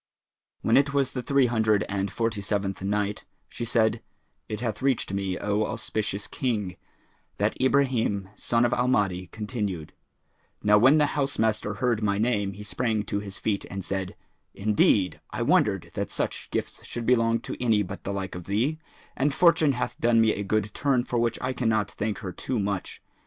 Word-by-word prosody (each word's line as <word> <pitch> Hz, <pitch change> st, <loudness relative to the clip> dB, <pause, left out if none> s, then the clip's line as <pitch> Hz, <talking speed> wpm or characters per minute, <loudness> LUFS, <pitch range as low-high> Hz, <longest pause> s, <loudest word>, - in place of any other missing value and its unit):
When 115 Hz, -, +4 dB
it 140 Hz, 0 st, +2 dB
was 135 Hz, -2 st, +1 dB
the 125 Hz, -, -2 dB
Three 140 Hz, 0 st, +3 dB
Hundred 110 Hz, -3 st, +2 dB
and 100 Hz, -1 st, -2 dB
Forty 115 Hz, -2 st, -1 dB
seventh 100 Hz, -1 st, -2 dB
Night, 105 Hz, +1 st, -1 dB, 0.2 s
She -, -, -6 dB
said, 110 Hz, -1 st, +2 dB, 0.5 s
It 105 Hz, -, -3 dB
hath 115 Hz, -2 st, -3 dB
reached 130 Hz, -7 st, +1 dB
me, 95 Hz, -2 st, -1 dB
O 105 Hz, +1 st, 0 dB
auspicious 105 Hz, -1 st, -2 dB
King, 110 Hz, -, -2 dB, 0.6 s
that -, -, +1 dB
Ibrahim 125 Hz, -8 st, +2 dB
son 115 Hz, +3 st, +1 dB
of 120 Hz, -, +1 dB
Al 125 Hz, +1 st, +1 dB
Mahdi 95 Hz, -7 st, +1 dB
continued: 105 Hz, -5 st, -4 dB, 0.7 s
"Now 105 Hz, 0 st, +6 dB
when 135 Hz, +7 st, +6 dB
the 150 Hz, -, +5 dB
housemaster 110 Hz, -7 st, 0 dB
heard 120 Hz, -3 st, 0 dB
my 100 Hz, -2 st, +1 dB
name 105 Hz, -3 st, +1 dB
he 105 Hz, +2 st, -9 dB
sprang 110 Hz, 0 st, -1 dB
to 100 Hz, 0 st, -2 dB
his 100 Hz, -1 st, -6 dB
feet 100 Hz, -3 st, -1 dB
and 95 Hz, -2 st, -5 dB
said, 95 Hz, -1 st, -3 dB, 0.4 s
'Indeed 100 Hz, -2 st, +2 dB
I -, -, -2 dB
wondered -, -, +2 dB
that -, -, -3 dB
such -, -, -3 dB
gifts -, -, -3 dB
should 120 Hz, -1 st, -5 dB
belong 115 Hz, -1 st, +3 dB
to -, -, -5 dB
any 110 Hz, -4 st, +3 dB
but 90 Hz, -, -8 dB
the 100 Hz, -, -3 dB
like 95 Hz, -2 st, -4 dB
of 90 Hz, -1 st, -7 dB
thee; 120 Hz, -, 0 dB, 0.4 s
and 145 Hz, +3 st, +1 dB
Fortune 165 Hz, -1 st, +4 dB
hath 125 Hz, -, -3 dB
done 120 Hz, -1 st, +4 dB
me 110 Hz, -1 st, +5 dB
a 100 Hz, -, -4 dB
good 105 Hz, +1 st, -1 dB
turn 135 Hz, -4 st, +1 dB
for 120 Hz, -1 st, -1 dB
which 115 Hz, 0 st, +1 dB
I 130 Hz, 0 st, -1 dB
cannot 110 Hz, -4 st, 0 dB
thank 105 Hz, 0 st, -2 dB
her 90 Hz, -, -3 dB
too 125 Hz, +8 st, -3 dB
much. 100 Hz, -2 st, -3 dB
110 Hz, 185 wpm, -26 LUFS, 100-125 Hz, 0.7 s, Now